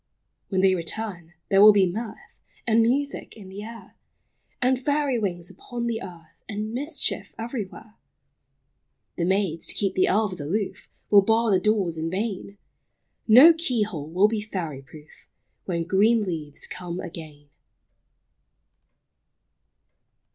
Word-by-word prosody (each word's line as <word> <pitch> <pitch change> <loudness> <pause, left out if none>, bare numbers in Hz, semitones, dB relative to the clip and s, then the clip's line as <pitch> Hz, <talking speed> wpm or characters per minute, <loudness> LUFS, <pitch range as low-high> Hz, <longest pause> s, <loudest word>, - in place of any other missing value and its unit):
When 190 -2 +1
they 190 0 +4
return, 175 -1 -5
there 195 0 +5
will 210 0 +9
be 200 -2 +4
mirth 215 +5 -7 0.2
And 230 -1 +4
music 265 +2 -1
in 195 -3 -11
the 195 +2 -8
air, 230 +2 -11 0.6
And 255 +1 +2
fairy 285 -2 0
wings 175 -4 -2
upon 240 -1 -6
the 230 -1 -2
earth, 170 -4 -12
And 215 +1 -4
mischief 290 +5 -3
everywhere. 225 -2 -6 1.2
The 170 - 0
maids, 190 -3 0
to - - 0
keep 195 -2 0
the 185 - +2
elves 195 -4 0
aloof, 195 +8 -3 0.2
Will 205 -1 +8
bar 225 +2 +2
the 190 - +4
doors 190 -5 0
in 160 +1 -2
vain; 200 +1 -4 0.7
No 260 +10 +9
key 265 -9 0
hole 160 -8 -6
will 185 +5 +4
be 215 -1 -2
fairy 170 -9 -5
proof, 150 +3 -17 0.4
When 170 -3 -2
green 210 +6 +3
leaves 155 -6 -4
come 180 -1 -6
again. 155 -5 -9
200 Hz, 135 wpm, -25 LUFS, 175-225 Hz, 1.2 s, will